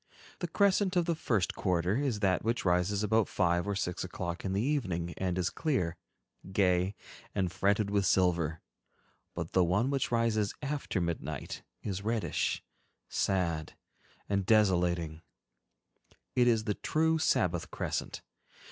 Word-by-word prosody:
The - - -2
crescent 200 -1 +2
of 175 -1 +3
the 170 - +1
first 115 - 0
quarter 90 0 0
is 130 -6 -1
that 95 -3 +2
which 115 0 -1
rises 90 +3 +2
about 110 +1 +3
five 85 0 +1
or 100 - 0
six 90 -2 -2
o'clock 85 0 -4
in 95 - -2
the 100 - +1
evening 95 - -1
and 90 -1 -1
is 90 -1 0
clear, 130 - 0 0.6
gay, 95 0 +2 0.4
and 95 -3 0
fretted 100 +2 +1
with 100 -1 +2
silver; 85 -4 +2 0.7
but 85 -1 -4
the 95 - +4
one 105 +10 +2
which 135 -3 0
rises 115 -3 +1
after 140 -7 -2
midnight 80 -4 -3 0.2
is 100 -2 -3
reddish, 110 +1 -1 0.5
sad, 85 -5 0 0.5
and 100 -2 0
desolating—it 90 -6 +2 1.3
is 115 -3 +3
the 105 - 0
true 160 +7 +1
Sabbath 90 - +1
crescent. - - -3
100 Hz, 140 wpm, -31 LUFS, 90-115 Hz, 1.3 s, the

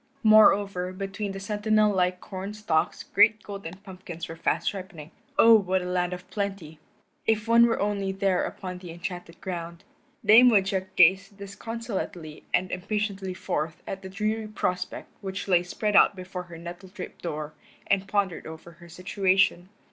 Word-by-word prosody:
Moreover, 200 -4 +5
between 195 +2 -4
the 195 - -6
sentinel 210 +1 +2
like 180 -1 +1
corn 195 +2 -6
stalks 175 -7 0
great 215 +1 +3
golden 195 -4 -7
pumpkins 180 -3 -8
were 165 - -7
fast 165 - 0
ripening. 185 -5 -9 0.3
Oh, 230 - +8
what 190 -4 +3
a - - -5
land 180 0 0
of 180 0 -7
plenty! 195 -7 -4 0.5
If 220 0 +1
one 235 +1 +6
were 230 - 0
only 200 -1 -1
there 190 -1 +1
upon 185 -2 -6
the 180 -1 -10
enchanted 175 0 -7
ground. 170 -1 -6 0.4
Dame 240 +4 +8
Woodchuck 190 -3 +1
gazed 190 +3 +4
disconsolately 200 -6 -6
and 185 +1 +1
impatiently 195 0 -3
forth 160 -4 -3
at 195 - -5
the 190 - -8
dreary 215 +3 -2
prospect 180 -3 -3
which 190 0 -5
lay 180 -3 +4
spread 205 +4 -2
out - - +6
before 180 -1 -7
her 170 - -9
nettle 175 +3 -9
draped 185 0 -9
door 155 -2 -5 0.3
and 195 -1 +1
pondered 200 -3 -1
over 160 +2 -10
her 170 +1 -16
situation. 185 0 +1
190 Hz, 160 wpm, -26 LUFS, 180-205 Hz, 0.5 s, Oh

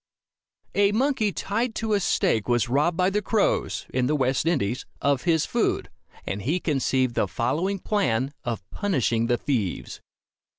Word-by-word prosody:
A 200 0 +3
monkey 235 -3 +1
tied 220 +5 -2
to 220 -1 -1
a 205 - +3
stake 115 - +1
was 120 -1 +2
robbed 150 +7 +2
by 185 +1 +2
the 210 +1 0
crows, 210 +1 0
in 125 -1 +1
the 150 - +1
West 135 +2 +1
Indies, 130 -8 0 0.2
of 140 0 +1
his 160 -3 +3
food, - - -1 0.3
and 100 - -3
he 155 - 0
conceived 130 -5 +1
the 105 - +1
following 150 - -1
plan 140 - 0
of 110 -6 -4
punishing 125 - 0
the 120 0 +2
thieves. 115 -11 -2
145 Hz, 160 wpm, -25 LUFS, 120-200 Hz, 0.3 s, A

